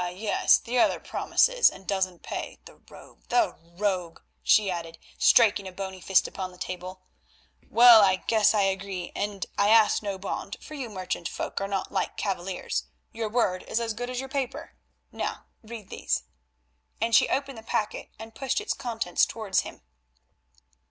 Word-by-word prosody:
yes, 210 Hz, +3 st, +3 dB
the 245 Hz, +2 st, -2 dB
other -, -, +3 dB
promises -, -, +3 dB
and 190 Hz, -, -13 dB
doesn't 185 Hz, -3 st, -2 dB
pay—the -, -, -7 dB
rogue, -, -, -15 dB
the 355 Hz, -3 st, +2 dB, 0.2 s
rogue," 185 Hz, -5 st, -1 dB, 0.2 s
she 205 Hz, -3 st, +4 dB
added, 165 Hz, -1 st, -6 dB, 0.2 s
striking 205 Hz, -4 st, +5 dB
a -, -, -7 dB
bony 190 Hz, 0 st, -7 dB
fist 195 Hz, 0 st, +3 dB
upon 185 Hz, -1 st, -6 dB
the 180 Hz, -, -16 dB
table. 185 Hz, +1 st, -7 dB, 0.7 s
"Well, 235 Hz, -1 st, +9 dB
I 190 Hz, -2 st, +2 dB, 0.4 s
agree, 190 Hz, -2 st, -2 dB
and 200 Hz, -2 st, -3 dB
I 200 Hz, +1 st, +4 dB
ask 220 Hz, -1 st, +5 dB
no 200 Hz, -2 st, -4 dB
bond, 195 Hz, +1 st, -5 dB
for -, -, -11 dB
you 265 Hz, -5 st, -5 dB
merchant 185 Hz, -4 st, -4 dB
folk -, -, -4 dB
are 195 Hz, -, -1 dB
not 195 Hz, -1 st, -3 dB
like -, -, -2 dB
cavaliers, 180 Hz, -, -3 dB, 0.3 s
your 225 Hz, -1 st, -3 dB
word 210 Hz, -5 st, +1 dB
is -, -, 0 dB
as 230 Hz, -1 st, -2 dB
good 245 Hz, +3 st, -5 dB
as 250 Hz, -1 st, -3 dB
your 265 Hz, -, -5 dB
paper. 270 Hz, -1 st, -4 dB, 0.4 s
Now -, -, -4 dB, 0.2 s
read 220 Hz, -3 st, -10 dB
these," -, -, -1 dB, 0.8 s
and 230 Hz, +1 st, -1 dB
she 225 Hz, -, +5 dB
opened 275 Hz, -3 st, -2 dB
the -, -, -11 dB
packet 215 Hz, -1 st, -3 dB
and 225 Hz, +1 st, -10 dB
pushed 270 Hz, -, -1 dB
its 425 Hz, 0 st, -2 dB
contents 225 Hz, -8 st, -1 dB
towards 215 Hz, -4 st, -1 dB
him. -, -, -6 dB
205 Hz, 165 wpm, -27 LUFS, 185-230 Hz, 0.8 s, Well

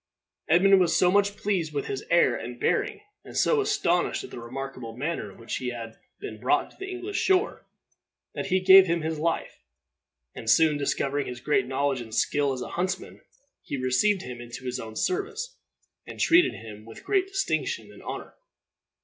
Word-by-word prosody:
Edmund 190 Hz, +4 st, +6 dB
was 175 Hz, -3 st, +3 dB
so 180 Hz, -1 st, +4 dB
much 205 Hz, +1 st, +2 dB
pleased 180 Hz, -7 st, -1 dB
with 140 Hz, -, -1 dB
his 135 Hz, -, -4 dB
air 170 Hz, -8 st, +4 dB
and 120 Hz, 0 st, -7 dB
bearing, 415 Hz, 0 st, 0 dB, 0.2 s
and -, -, -8 dB
so 455 Hz, -3 st, +3 dB
astonished 290 Hz, -, +1 dB
at -, -, -10 dB
the -, -, -7 dB
remarkable 125 Hz, -1 st, -7 dB
manner 145 Hz, -7 st, -3 dB
in -, -, -17 dB
which 115 Hz, 0 st, -4 dB
he 130 Hz, -, -4 dB
had 115 Hz, -2 st, -7 dB, 0.2 s
been 410 Hz, 0 st, -7 dB
brought -, -, +1 dB
to -, -, -22 dB
the 390 Hz, 0 st, -5 dB
English 375 Hz, +2 st, -4 dB
shore, 380 Hz, +3 st, +1 dB, 0.7 s
that -, -, -4 dB
he 185 Hz, -1 st, +2 dB
gave 190 Hz, 0 st, +8 dB
him 170 Hz, 0 st, 0 dB
his 160 Hz, 0 st, -3 dB
life; 165 Hz, +1 st, -2 dB, 0.7 s
and 115 Hz, -, -5 dB
soon 160 Hz, +3 st, +5 dB
discovering 140 Hz, 0 st, -1 dB
his 125 Hz, -1 st, -6 dB
great 130 Hz, -1 st, +1 dB
knowledge 135 Hz, 0 st, 0 dB
and 110 Hz, -2 st, -8 dB
skill 145 Hz, +2 st, +1 dB
as 130 Hz, -2 st, -3 dB
a -, -, -7 dB
huntsman, 185 Hz, +2 st, -3 dB, 0.4 s
he 140 Hz, -, -5 dB
received 130 Hz, +11 st, +2 dB
him 125 Hz, -1 st, -7 dB
into 120 Hz, +2 st, -9 dB
his 125 Hz, 0 st, -3 dB
own 110 Hz, -1 st, -8 dB
service, 425 Hz, -, -2 dB, 0.5 s
and -, -, -9 dB
treated 345 Hz, +2 st, +5 dB
him 105 Hz, -2 st, -10 dB
with 115 Hz, 0 st, -12 dB
great 390 Hz, -2 st, +1 dB
distinction 390 Hz, +4 st, -2 dB
and -, -, -14 dB
honor. -, -, -7 dB
160 Hz, 185 wpm, -26 LUFS, 125-205 Hz, 0.7 s, gave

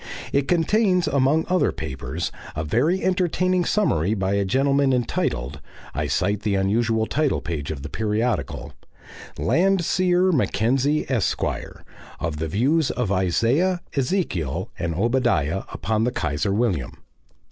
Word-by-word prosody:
It 140 Hz, 0 st, +1 dB
contains 180 Hz, +1 st, +2 dB
among 140 Hz, +2 st, +2 dB
other 185 Hz, 0 st, +2 dB
papers 65 Hz, +4 st, -4 dB, 0.2 s
a 75 Hz, -, -2 dB
very 145 Hz, -, +1 dB
entertaining 185 Hz, -1 st, +1 dB
summary 105 Hz, -, +1 dB
by 95 Hz, -1 st, -1 dB
a 100 Hz, 0 st, +2 dB
gentleman 135 Hz, +6 st, +2 dB
entitled 70 Hz, -, -1 dB, 0.3 s
I 75 Hz, 0 st, -2 dB
cite 95 Hz, +7 st, 0 dB
the 105 Hz, -2 st, 0 dB
unusual 110 Hz, +3 st, +1 dB
title 150 Hz, +4 st, 0 dB
page 75 Hz, -5 st, -4 dB
of 70 Hz, -4 st, -5 dB
the -, -, -4 dB
periodical 105 Hz, -, -2 dB, 0.6 s
"Landseer 185 Hz, 0 st, +2 dB
Mackenzie, 135 Hz, -, +1 dB
Esq.," 125 Hz, -6 st, 0 dB, 0.8 s
of 80 Hz, -2 st, -3 dB
the 80 Hz, +1 st, -2 dB
views 135 Hz, -, +1 dB
of 120 Hz, -6 st, -2 dB
Isaiah, 115 Hz, -, +1 dB
Ezekiel, 130 Hz, -, -1 dB
and 85 Hz, -1 st, -2 dB
Obadiah 95 Hz, -, +1 dB
upon 110 Hz, +6 st, -1 dB
the 125 Hz, -, +1 dB
Kaiser 75 Hz, -, -1 dB
William. 100 Hz, -, 0 dB
115 Hz, 125 wpm, -23 LUFS, -, 0.8 s, contains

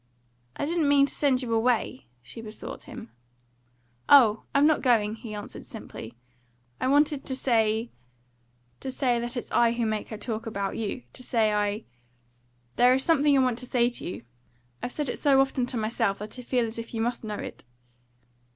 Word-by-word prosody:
"I -, -, -2 dB
didn't 320 Hz, -1 st, +1 dB
mean 280 Hz, -1 st, +6 dB
to -, -, -7 dB
send 270 Hz, -3 st, +1 dB
you 230 Hz, -2 st, -2 dB
away," 225 Hz, -, 0 dB, 0.2 s
she 125 Hz, -, -9 dB
besought 215 Hz, -1 st, -8 dB
him. 235 Hz, -2 st, -10 dB, 1.0 s
"Oh, 230 Hz, -7 st, +6 dB
I'm 280 Hz, +1 st, +5 dB
not 310 Hz, -1 st, +3 dB
going," 220 Hz, -5 st, +3 dB
he 220 Hz, -1 st, -8 dB
answered 205 Hz, -, -7 dB
simply. 115 Hz, +2 st, -9 dB, 0.6 s
"I -, -, 0 dB
wanted 290 Hz, +1 st, +3 dB
to 260 Hz, -, -3 dB
say 225 Hz, -3 st, +1 dB, 0.9 s
to 265 Hz, -, -5 dB
say 255 Hz, -2 st, +1 dB
that 240 Hz, +2 st, -4 dB
it's -, -, -5 dB
I 235 Hz, -1 st, +4 dB
who 235 Hz, -1 st, -1 dB
make 215 Hz, -1 st, -2 dB
her 215 Hz, -, -6 dB
talk 220 Hz, +1 st, -4 dB
about 200 Hz, -3 st, -3 dB
you. 225 Hz, +3 st, -3 dB
To -, -, -10 dB
say 225 Hz, -4 st, +1 dB
I 210 Hz, +1 st, 0 dB, 0.9 s
There 250 Hz, +1 st, +6 dB
is 265 Hz, -, 0 dB
something 295 Hz, -3 st, +4 dB
I -, -, +5 dB
want 250 Hz, -2 st, 0 dB
to 250 Hz, -, -7 dB
say 240 Hz, -1 st, +2 dB
to 245 Hz, -, -7 dB
you; 180 Hz, -, -6 dB, 0.6 s
I've 245 Hz, -, -3 dB
said 295 Hz, +1 st, -3 dB
it 245 Hz, -, -4 dB
so 275 Hz, -3 st, +5 dB
often 270 Hz, -2 st, +1 dB
to 250 Hz, -, -3 dB
myself 220 Hz, -2 st, 0 dB
that 210 Hz, +4 st, -7 dB
I -, -, -5 dB
feel 245 Hz, -1 st, 0 dB
as 225 Hz, +1 st, -6 dB
if 230 Hz, +1 st, -7 dB
you 225 Hz, -, -1 dB
must 240 Hz, +1 st, -1 dB
know 210 Hz, -1 st, -4 dB
it." -, -, -7 dB
240 Hz, 195 wpm, -27 LUFS, 220-265 Hz, 1.0 s, mean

